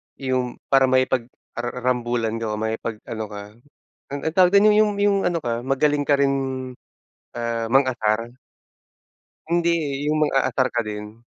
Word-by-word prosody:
yung 130 -2 -2 0.2
para 135 -1 +5
makipag-ara 130 -2 -1
rambulan 120 -2 0
ka, 110 -2 -3
makipag 110 +1 -3
ano 110 -1 -5
ka, 105 -1 -8 0.7
an 140 - -2
ano 160 - 0
tawag 180 -1 +6
dun, 200 +1 +6
yung 215 -1 +4
yung 205 -1 +3
ano 170 - +1
ka, 120 -3 -3
magaling 145 +2 +1
ka 140 -1 +2
rin, 140 0 +3 1.0
ah, 115 -1 -2
mang-asar. 120 -3 +1 1.2
Hindi, 170 0 +2
eh, 145 -4 -2
yung 155 0 +1
mang-aasar 135 -3 +2
ka 120 - 0
din. 105 +1 -7
130 Hz, 145 wpm, -22 LUFS, 115-145 Hz, 1.2 s, tawag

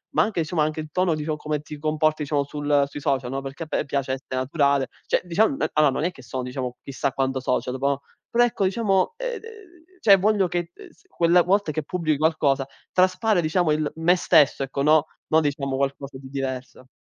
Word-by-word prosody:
ma - - +5
anche 210 -5 -2
insomma, 155 -1 0
anche 155 +1 -2
il 155 -1 -6
tono 180 -1 +1
diciamo, 155 0 -2
come 150 -1 -3
ti 150 0 -9
comporti 155 0 0
diciamo 145 0 0
sul 145 0 +1
sui 145 - -8
social, 135 -3 -1
no, 135 +1 -3
perché 135 +4 -8
a - - -9
me - - -1
piace 135 -2 -1
esse 135 - -6
naturale, 140 +1 +1 0.2
cioè - - +1
dicia 180 +5 +3
mhmm, 275 - -1
allora 150 -2 +4
non 150 - -2
è 175 - +2
che 130 - -15
sono 130 +2 -4
diciamo, 125 -1 -5
chissà 140 0 -2
quanto 135 0 -1
social 125 0 -1
dopo, 135 +1 -3
oh, 140 0 0 0.3
però 240 +1 +4
ecco 225 -4 0
diciamo, 195 - +1
ehm, - - -3
d - - -23
ehm 455 - -9 0.5
cioè 200 -3 +7
voglio 200 -1 +2
che, 175 0 -3
ehm, - - -13
s - - -27
quella 175 +1 +4
volta 190 -2 +1
che 155 - -2
pubbli 155 -1 -1
qualcosa 145 -4 +1 0.3
traspare 185 +1 +3
diciamo 160 0 +1
il 150 -1 0
me 170 +3 +3
stesso, 145 -5 +4
ecco, 135 +1 -3
no, 155 +1 +4 0.2
no 160 +1 +4
diciamo 140 -2 -1
qualcosa 140 0 -3
di 130 -1 -11
diverso. 130 -1 -5
150 Hz, 220 wpm, -24 LUFS, 135-175 Hz, 0.5 s, cioè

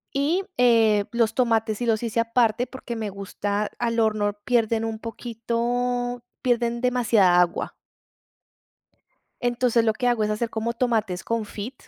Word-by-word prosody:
Y, 310 +8 +1
eh, 225 -4 +4
los 230 -2 +2
tomates 225 -4 +1
sí 245 - -3
los 225 0 +1
hice 230 0 -1
aparte 230 +1 +1
porque 255 -3 -7
me 215 -2 -3
gusta 200 +1 -3
al 230 -1 0
horno 210 -2 +1
pierden 230 -2 +1
un 225 -1 -3
poquito, 240 +2 -2 0.2
pierden 235 -1 0
demasiada 225 -8 +3
agua. 175 -1 0 1.7
Entonces, 240 -1 +2
lo 220 -1 +2
que 245 +3 -1
hago 240 -3 +2
es 210 - 0
hacer 220 +2 -1
como 230 +1 -2
tomates 220 -7 -1
confit. 225 +1 -4
230 Hz, 140 wpm, -24 LUFS, 215-245 Hz, 1.7 s, eh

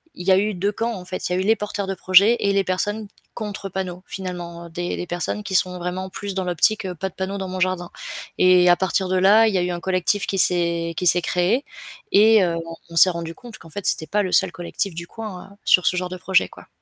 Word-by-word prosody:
il 180 - -8
y 190 - +5
a 185 - +6
eu 210 +2 0
2 200 +3 0
camps 230 +3 -2
en 180 - -11
fait, 185 0 -4
il - - -1
y - - +1
a - - 0
eu - - 0
les 220 - +4
porteurs 205 -2 -4
de 195 - -2
projets 190 +5 +5
et 200 - +1
les 195 0 +2
personnes 205 +4 -2 0.3
contre 205 -3 -5
panneaux 185 -1 -5
finalement, 175 -2 -7
heu, - - -11
des 175 +2 -4
des - - -4
personnes 175 +4 -3
qui 200 -2 -6
sont 180 0 +2
vraiment 180 +2 -4
plus 200 +1 -6
dans 190 0 -2
l'optique, 180 +4 +1
heu 180 -1 -4
«pas 190 +4 -4
de - - -24
panneaux 190 +1 -4
dans 190 -1 -4
mon 185 0 -5
jardin», 185 -1 -1 0.5
et 180 -1 +5
à 175 - +7
partir 190 +1 0
de 185 - 0
là, 210 +4 +5
il 215 - 0
y - - +2
a - - +1
eu 180 0 -1
un 175 - -4
collectif 185 +3 0
qui 195 - -2
s'est 170 -2 +2
qui 180 - -2
s'est 175 +1 +5
créé 180 +11 0 0.5
et 215 0 +6
heu, 170 -2 0
on 165 0 -8
on 165 - -11
s'est 185 - +7
rendu 165 -1 -6
compte 240 -3 -11
qu'en 165 - -14
fait 200 +4 -7
c'était 160 - +1
pas 205 +6 0
le 185 - -3
seul 190 -2 +3
collectif 175 +1 -3
du 170 - -5
coin, 210 -4 -8
heu, - - -17
sur 180 - +5
ce 180 - +3
genre 180 0 -2
de 185 - -6
projet, 190 +1 +1
quoi. - - -15
185 Hz, 280 wpm, -22 LUFS, 175-200 Hz, 0.5 s, à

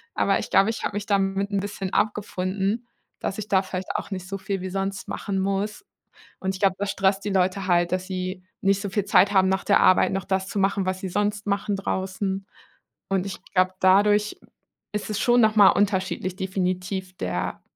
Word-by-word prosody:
Aber - - +2
ich - - -5
glaube, 195 +3 +5
ich 225 - -6
habe 205 - -2
mich 205 - -3
damit 195 0 0
'n 200 - +1
bisschen 195 -2 -5
abgefunden, 205 +2 -1 0.3
dass 195 - -3
ich 210 0 -6
da 190 -1 +4
vielleicht 185 0 -5
auch - - -3
nicht 185 -1 -5
so 195 +1 -4
viel 190 0 -3
wie 185 - -4
sonst 195 +1 -3
machen 200 -1 -3
muss. 200 - -2 0.6
Und 190 0 -2
ich 190 - -8
glaube, 195 -2 +3
das 200 0 -1
stresst 195 +1 +1
die 205 - -2
Leute 190 0 +1
halt, 175 -1 +3
dass 185 0 -1
sie 185 -1 -4 0.2
nicht 195 0 +2
so 200 - -3
viel 200 0 0
Zeit 200 +2 +5
haben, 190 -1 +4
nach 190 0 0
der - - +4
Arbeit 185 - +5
noch 195 -1 -2
das 190 0 -1
zu 205 - -3
machen, 195 0 +1
was 185 0 -2
sie 190 - -4
sonst 205 +2 -1
machen 200 0 0
draußen. 195 0 -3 0.6
Und 195 -1 0
ich 195 - -5 0.2
glaube, 185 0 +3
dadurch 205 +2 +4 0.5
ist 210 +1 -3
es 210 - -1
schon 245 0 +4
nochmal 215 -3 +6
unterschiedlich 190 -2 0
definitiv 185 -1 -3
der 90 0 -3
195 Hz, 205 wpm, -24 LUFS, 185-200 Hz, 0.6 s, nochmal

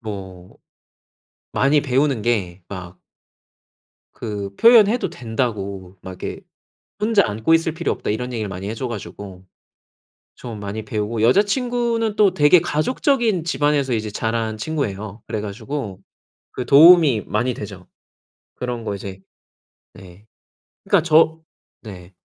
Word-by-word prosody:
뭐 95 -3 -9 1.0
많이 145 +2 +3
배우는 135 -3 +1
게 95 -6 -1
막 90 -2 -9 1.1
그 100 -3 -5
"표현해도 230 0 +5
된다."고 100 -6 -4
막 95 -1 -10
이렇게 - - -5 0.6
"혼자 210 -1 +3
안고 110 +9 0
있을 165 -1 +2
필요 160 - -2
없다." - - -4
이런 125 +4 -3
얘기를 110 -3 -3
많이 95 +1 -6
해 - - -3
줘 125 +3 -4
가지고 100 -4 -8 0.9
좀 115 -4 -8
많이 105 +2 -5
배우고 110 +1 -3
여자친구는 230 - +1
또 205 -4 +4
되게 155 +1 +5
가족적인 220 - 0
집안에서 145 -5 0
이제 110 -1 -2
자란 110 +1 -2
친구예요. 110 -6 -4
그래 110 - -3
가지고 105 0 -6 0.5
그 125 - -5
도움이 150 -5 +7
많이 120 +4 0
되죠. 100 -5 -9 0.7
그런 125 -2 -4
거 105 - -3
이제 95 -1 -8 0.7
네. 95 +3 -15 0.6
그러니까 - - +3
저 160 -1 +4 0.4
네. 95 -4 -11
115 Hz, 260 characters per minute, -21 LUFS, 100-155 Hz, 1.1 s, 도움이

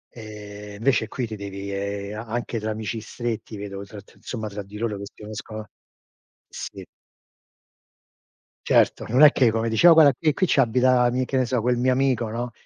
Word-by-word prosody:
Ehm, 105 -2 -9
invece 115 0 +1
qui 125 +3 -3
ti 110 -1 -6
devi, 100 0 -6
ehm, 100 +1 -4
a 115 - -7
anche 120 0 -3
tra 110 - -3
amici 110 +1 -4
stretti 115 -1 -5
vedo 100 -1 -6
tr 100 0 -11
tra - - -23
insomma, 110 -3 -6
tra 105 0 -6
di 100 +1 -11
loro 110 -2 -2
che - - -6
si - - -15
uniscono 110 0 -7 0.8
sì. - - -8 1.8
Certo, - - +3
non 130 +5 +5
è 150 - +10
che 125 -4 +4
come 115 +1 -1
dici: 110 +10 +4
"O 175 - +10
guarda 155 -4 +7
qui 155 +4 +1
qui 185 - +1
ci 140 - +4
abita 125 0 +3
mi" 130 +1 0
che 135 - -4
ne 130 -1 +3
so, 125 0 0
"quel 125 +2 +1
mio 125 +2 +2
amico" 130 -3 +1
no? 120 +2 -4
110 Hz, 200 wpm, -24 LUFS, 105-125 Hz, 1.8 s, è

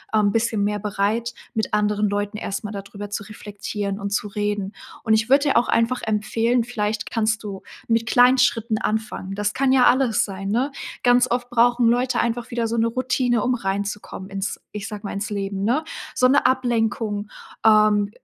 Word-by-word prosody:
ähm, 210 -2 +3
bisschen 225 -2 0
mehr 210 0 0
bereit, 210 +3 -1 0.2
mit 220 -1 -1
anderen 210 0 +1
Leuten 205 +1 -2
erst 200 -1 -4
mal 210 - -5
da 200 -2 -5
drüber 205 +1 -9
zu 205 - -3
reflektieren 205 -1 -5
und 200 - -3
zu 210 - -1
reden. 205 -1 -2 0.3
Und 220 - +2
ich 220 +2 +2
würde 280 +1 +4
dir - - +3
auch 235 - +3
einfach 235 +2 +1
empfehlen 225 +3 +1
vielleicht 215 -3 -3
kannst 220 0 0
du 195 -2 -6 0.3
mit 230 0 +1
kleinen 250 +2 +5
Schritten 230 -3 +2
anfangen. 215 -3 -3
Das 205 0 -1
kann 270 0 +2
ja 255 - +5
alles 255 -3 +3
sein, 195 -1 -6
ne? 250 +7 0 0.3
Ganz 245 0 +4
oft 245 0 -1
brauchen 240 0 +4
Leute 245 +2 +1
einfach 235 +1 -1
wieder 235 -1 -1
so 230 - -2
'ne 230 0 +3
Routine, 245 -1 0
um 255 - +1
reinzukommen 200 -2 -4
ins 195 0 -3
ich 210 -1 -5
sage 210 -2 -7
mal, - - -4
ins 200 +2 -3
Leben, 195 -1 -3
ne? 260 +8 +1 0.3
So 255 - +4
'ne 265 - +3
Ablenkung 225 -4 0 0.4
ähm, 215 -2 +5
220 Hz, 190 wpm, -22 LUFS, 205-240 Hz, 0.4 s, kleinen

